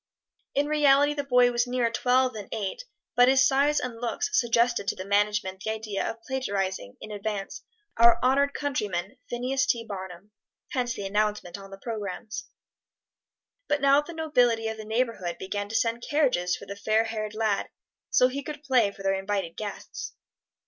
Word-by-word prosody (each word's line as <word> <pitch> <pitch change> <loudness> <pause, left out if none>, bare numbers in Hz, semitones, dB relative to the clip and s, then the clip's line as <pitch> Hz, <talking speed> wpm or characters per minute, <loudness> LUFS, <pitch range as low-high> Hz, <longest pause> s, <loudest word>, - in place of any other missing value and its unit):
In 285 - +3
reality 290 -1 +4
the 285 -1 -2
boy 250 -2 +4
was 240 0 +1
nearer 245 -2 +1
twelve 255 +2 +2
than 210 -3 -8
eight, 215 - -3 0.3
but 245 0 +6
his 265 +1 +5
size 285 +2 +3
and 240 -2 -5
looks 425 - -2
suggested 235 - +2
to - - 0
the 185 - -6
management 205 -1 +1
the 220 - -2
idea 220 -2 -2
of 225 0 -8
plagiarizing, 195 - -3
in 215 - -9
advance, 205 -1 -4 0.4
our 235 0 +7
honored 280 +2 +3
countryman, 210 -6 -2
Phineas 255 +2 0
T. 230 -1 +1
Barnum. 190 -1 -8 0.4
Hence 245 -2 -1
the 200 - -5
announcement 210 -2 -1
on 195 0 -11
the 195 - -9
programs. 215 +1 -5 1.2
But 295 - +1
now 280 0 +5
the 340 +3 -9
nobility 245 -8 +2
of 220 - -5
the 215 - -8
neighborhood 220 -6 -1
began 205 +1 -4
to 225 - -5
send 230 +1 +1
carriages 250 - +1
for - - -11
the 200 - -7
fair 215 +2 +2
haired 215 -2 -4
lad, 215 -2 0 0.4
so 250 - +5
he 270 +2 -4
could 295 +1 -7
play 255 -7 +3
for 195 0 -11
their 195 0 +2
invited 195 -3 -2
guests. 210 -2 -6
230 Hz, 175 wpm, -27 LUFS, 205-260 Hz, 1.2 s, our